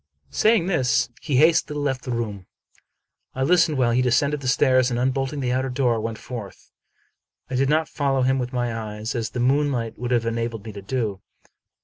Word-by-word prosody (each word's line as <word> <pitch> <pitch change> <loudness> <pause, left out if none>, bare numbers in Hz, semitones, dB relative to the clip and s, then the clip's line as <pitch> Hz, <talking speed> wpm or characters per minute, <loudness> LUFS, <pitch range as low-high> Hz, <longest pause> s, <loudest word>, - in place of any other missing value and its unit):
Saying 215 - +3
this, 150 -11 +1
he 150 -4 -2
hastily 155 +1 +3
left 135 -3 -1
the 125 - -3
room. 105 -6 -4 0.9
I 130 - -1
listened 165 -1 +3
while 120 -2 +2
he 125 +2 +2
descended 140 +4 +2
the 135 - -6
stairs, 130 -1 +3
and, 120 -1 -1
unbolting 135 +2 -1
the 125 -2 -1
outer 130 +1 0
door, 125 -3 +1
went 115 0 -4
forth. 115 -5 -9 0.8
I - - -1
did 135 +1 +2
not 155 +1 +2
follow 135 -3 0
him 130 +1 +2
with 125 0 -3
my 120 -2 -1
eyes, 110 0 -5
as 115 -3 -2
the 120 - -5
moon 140 +4 +2
light 115 -3 -3
would 120 0 -3
have 120 -2 +1
enabled 115 -1 -3
me 110 - -6
to 100 -1 -9
do. 105 -3 -3
125 Hz, 200 wpm, -23 LUFS, 115-140 Hz, 0.9 s, Saying